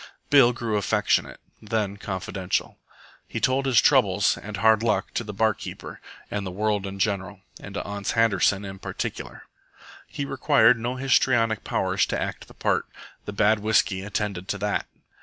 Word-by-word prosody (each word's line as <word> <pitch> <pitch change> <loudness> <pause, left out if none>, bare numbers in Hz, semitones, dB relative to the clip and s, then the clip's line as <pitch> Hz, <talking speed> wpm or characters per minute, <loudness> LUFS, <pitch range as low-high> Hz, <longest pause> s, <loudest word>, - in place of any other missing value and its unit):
Bill 135 -4 +7
grew 115 -3 -2
affectionate, 100 - 0 0.2
then 105 -2 -2
confidential. 95 -1 -3 0.5
He - - -4
told 135 +1 +1
his 130 -3 +5
troubles 105 -8 +3
and 105 -1 -7
hard 110 +1 +4
luck 105 -4 0
to - - -1
the 105 - -6
bar 110 +2 +2
keeper - - -9 0.3
and 105 -1 -2
the 95 - -4
world 105 +1 -1
in 95 0 -7
general, 100 -1 -2 0.2
and 100 - -10
to - - -3
Ans 100 0 -3
Handerson 100 -3 +2
in 95 0 -8
particular. - - -6 0.6
He 140 - -4
required 130 -3 +4
no 120 +2 -3
histrionic 120 -4 +2
powers - - 0
to - - -2
act - - -5
the - - -16
part. - - 0 0.4
The 105 - -5
bad 105 +1 +3
whisky 105 -2 +1
attended 100 -2 -3
to 100 - -2
that. 105 +1 -2
105 Hz, 165 wpm, -25 LUFS, 100-115 Hz, 0.6 s, Bill